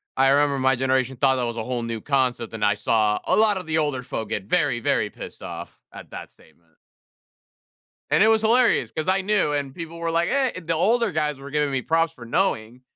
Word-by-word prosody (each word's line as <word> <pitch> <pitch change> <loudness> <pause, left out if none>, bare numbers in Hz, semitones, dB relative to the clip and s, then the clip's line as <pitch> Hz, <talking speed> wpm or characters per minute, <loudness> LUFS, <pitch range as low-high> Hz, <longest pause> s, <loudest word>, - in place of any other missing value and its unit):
I 135 0 +4
remember 140 0 +2
my 130 0 +3
generation 130 0 0
thought 130 +1 +2
that 125 - -1
was 120 0 -4
a 110 - -2
whole 125 +1 -3
new 115 -1 -4
concept, 130 -4 0
and 110 -1 -4
I 105 0 +4
saw 105 0 +1
a - - +2
lot 215 -2 +3
of 185 - -6
the 160 0 -1
older 145 -5 -1
folk 110 -4 -5
get 105 - -3
very, 145 - +1
very - - 0
pissed - - -10
off - - -8
at - - -12
that - - -8
statement 85 -1 -23 1.4
and - - +4
it - - +5
was 220 -1 +4
hilarious 225 - +3
'cause 155 +7 -4
I 190 +1 +2
knew 190 -6 +1
and 140 -2 -3
people 170 0 -8
were 170 0 -2
like, 170 +1 +1
"Eh" 265 -8 0
The 165 0 -1
older 220 +7 +2
guys 150 -3 -1
were 140 +1 -10
giving 150 -1 0
me 135 -1 -1
props 165 +3 +1
for 120 -6 -12
knowing 120 - -1
140 Hz, 225 wpm, -23 LUFS, 125-170 Hz, 1.4 s, it